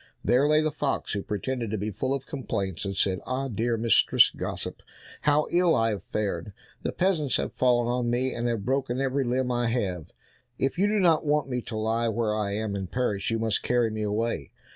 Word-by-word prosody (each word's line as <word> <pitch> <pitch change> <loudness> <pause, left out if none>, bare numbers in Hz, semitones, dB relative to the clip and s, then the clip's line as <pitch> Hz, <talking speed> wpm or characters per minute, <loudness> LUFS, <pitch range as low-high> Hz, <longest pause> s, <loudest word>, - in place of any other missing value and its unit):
There 135 +4 +4
lay 155 0 +5
the 155 0 0
fox, 145 -1 -2
who 100 - -1
pretended 115 +3 -3
to 110 - -2
be 105 +2 -3
full 130 +7 -2
of 135 - -6
complaints, 100 - -3
and 100 0 -3
said, 95 -2 +2
"Ah, 135 +1 -2
dear 115 +1 0
Mistress 115 +1 +5
Gossip, - - -5 0.4
how 150 +1 +3
ill 175 -1 +4
I 115 0 +2
have 105 -4 -3
fared, 100 -2 -3 0.3
the - - -2
peasants 170 -7 +1
have - - -3
fallen 120 -2 +2
on 120 0 0
me, 125 +2 0
and 120 0 -2
have 115 -4 -2
broken 130 -1 0
every 135 0 +1
limb 125 +1 0
I 120 -1 +1
have; 95 -9 -2 0.5
if 135 +6 -1
you 200 - +4
do 215 +1 +1
not 170 -4 +4
want 150 -2 +1
me 125 -1 -1
to 110 - -6
lie 115 +2 0
where 115 -1 0
I 105 -2 -1
am 105 0 -2
and 95 -2 -4
perish, 105 -6 -1
you 115 - 0
must 110 -2 0
carry 120 -2 +1
me 110 0 -4
away." 105 - -1
120 Hz, 215 wpm, -27 LUFS, 105-135 Hz, 0.5 s, lay